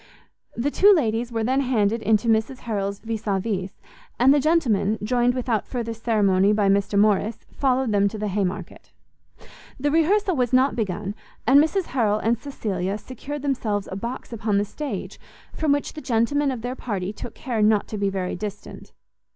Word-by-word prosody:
The 265 Hz, +5 st, 0 dB
two 405 Hz, +6 st, +6 dB
ladies 235 Hz, -5 st, 0 dB
were 225 Hz, -1 st, -1 dB
then 260 Hz, +4 st, +2 dB
handed 230 Hz, -4 st, +1 dB
to 215 Hz, +2 st, +2 dB
Mrs 225 Hz, +3 st, +1 dB
Harrel's 200 Hz, -3 st, -2 dB
vis 225 Hz, -1 st, -5 dB
a 195 Hz, -1 st, +1 dB
vis; 190 Hz, -2 st, -4 dB, 0.4 s
and 260 Hz, +3 st, +6 dB
the 290 Hz, -, +4 dB
gentlemen, 245 Hz, -9 st, +2 dB
joined 245 Hz, +2 st, +2 dB
without 240 Hz, -4 st, -1 dB
further 235 Hz, -3 st, -3 dB
ceremony 210 Hz, -3 st, +2 dB
by 205 Hz, -2 st, +2 dB
Mr 200 Hz, +1 st, +1 dB
Morrice, 210 Hz, +1 st, +2 dB
followed 260 Hz, -3 st, +1 dB
them 200 Hz, -1 st, +3 dB
to 215 Hz, -, -5 dB
the 210 Hz, 0 st, -2 dB
Haymarket. 195 Hz, -1 st, -4 dB, 0.9 s
The 290 Hz, +2 st, 0 dB
rehearsal 365 Hz, +4 st, +2 dB
was 250 Hz, -2 st, 0 dB
not 260 Hz, +2 st, +4 dB
begun, 200 Hz, -2 st, -2 dB, 0.3 s
and 275 Hz, +4 st, +7 dB
Mrs 375 Hz, +5 st, 0 dB
Harrel 215 Hz, -5 st, +2 dB
and 230 Hz, +2 st, 0 dB
Cecilia 200 Hz, -8 st, -3 dB
secured 265 Hz, +6 st, -7 dB
themselves 220 Hz, -8 st, -1 dB
a -, -, -4 dB
box 235 Hz, +4 st, -6 dB
upon 215 Hz, -2 st, 0 dB
the 205 Hz, -, +1 dB
stage, 245 Hz, -2 st, -6 dB, 0.3 s
from 310 Hz, -2 st, 0 dB
which 285 Hz, 0 st, 0 dB
the 305 Hz, -, -8 dB
gentlemen 275 Hz, +4 st, +1 dB
of 250 Hz, -4 st, -4 dB
their 250 Hz, +1 st, -3 dB
party 200 Hz, -6 st, -4 dB
took 230 Hz, -, -8 dB
care 235 Hz, -5 st, -3 dB
not 210 Hz, -1 st, +3 dB
to 215 Hz, -, -4 dB
be 200 Hz, -1 st, +1 dB
very 190 Hz, -2 st, -3 dB
distant. 205 Hz, +1 st, -8 dB
225 Hz, 180 wpm, -23 LUFS, 205-260 Hz, 0.9 s, and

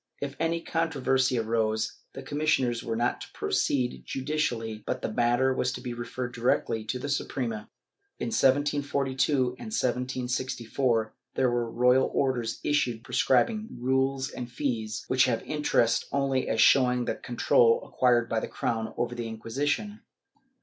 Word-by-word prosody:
If 140 Hz, 0 st, -4 dB
any 165 Hz, +1 st, 0 dB
controversy 135 Hz, -6 st, +1 dB
arose, 110 Hz, 0 st, 0 dB
the 135 Hz, -, -8 dB
commis 150 Hz, +3 st, -2 dB
sioners 120 Hz, -3 st, -1 dB
were 115 Hz, -1 st, -2 dB
not 120 Hz, +2 st, 0 dB
to -, -, -7 dB
proceed 125 Hz, -, 0 dB
judicially 120 Hz, -, -2 dB
but -, -, -2 dB
the 110 Hz, -, -2 dB
matter 120 Hz, +3 st, +2 dB
was 125 Hz, -1 st, 0 dB
to -, -, -5 dB
be 125 Hz, -2 st, -4 dB
referred 120 Hz, +1 st, -5 dB
directly 115 Hz, -2 st, 0 dB
to 120 Hz, -, -2 dB
the 125 Hz, -, -5 dB
Suprema.^ 120 Hz, -6 st, -2 dB, 0.5 s
In -, -, -3 dB
1742 140 Hz, -, +1 dB, 0.3 s
and -, -, -7 dB
1764, 125 Hz, -, -1 dB, 0.2 s
there 130 Hz, -2 st, +2 dB
were 120 Hz, -1 st, -1 dB
royal 125 Hz, +3 st, +3 dB
orders 125 Hz, -4 st, 0 dB
issued 125 Hz, -6 st, 0 dB
prescribing 215 Hz, -, +1 dB
rules 130 Hz, +1 st, 0 dB
and 120 Hz, -1 st, -7 dB
fees, 115 Hz, -5 st, -3 dB
which 130 Hz, 0 st, +4 dB
have 120 Hz, -3 st, 0 dB
interest 150 Hz, -6 st, +1 dB
only 135 Hz, -2 st, 0 dB
as 110 Hz, -, 0 dB
showing 125 Hz, -1 st, +5 dB
the -, -, 0 dB
control 120 Hz, -1 st, +3 dB
acquired 120 Hz, -2 st, +2 dB
by 115 Hz, -1 st, 0 dB
the -, -, -4 dB
crown 110 Hz, -1 st, -3 dB
over 120 Hz, 0 st, -1 dB
the 120 Hz, -1 st, -4 dB
Inquisition. 145 Hz, -, -2 dB
125 Hz, 150 wpm, -28 LUFS, 115-135 Hz, 0.5 s, showing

